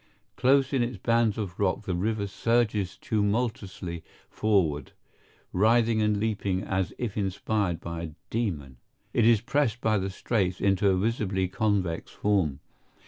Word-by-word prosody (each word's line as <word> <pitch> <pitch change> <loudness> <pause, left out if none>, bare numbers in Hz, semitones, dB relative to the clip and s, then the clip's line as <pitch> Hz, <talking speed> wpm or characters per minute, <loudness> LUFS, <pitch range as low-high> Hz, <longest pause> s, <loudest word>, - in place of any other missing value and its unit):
Close 135 +1 +3
in 135 - +2
its 120 +1 -2
bands 115 -2 +2
of 95 -5 -5
rock 100 +1 +1
the 95 - -2
river 100 +3 -1
surges 105 -2 0
tumultuously 105 -5 -2 0.3
forward, 95 -9 +1 0.6
writhing 110 +3 +3
and 105 -1 +2
leaping 100 -3 -1
as 95 -1 -1
if 115 -5 -3
inspired 100 -2 -1
by 85 0 -5
a 85 -2 -5 0.2
demon. 80 - -2 0.4
It 115 -2 +4
is 115 -3 +5
pressed 120 -2 0
by 110 -3 +2
the 95 +1 -2
straits 95 -2 -1
into 100 0 +3
a 95 - +3
visibly 100 -2 0
convex 95 -3 -1
form. 90 -9 0
105 Hz, 140 wpm, -27 LUFS, 95-115 Hz, 0.6 s, is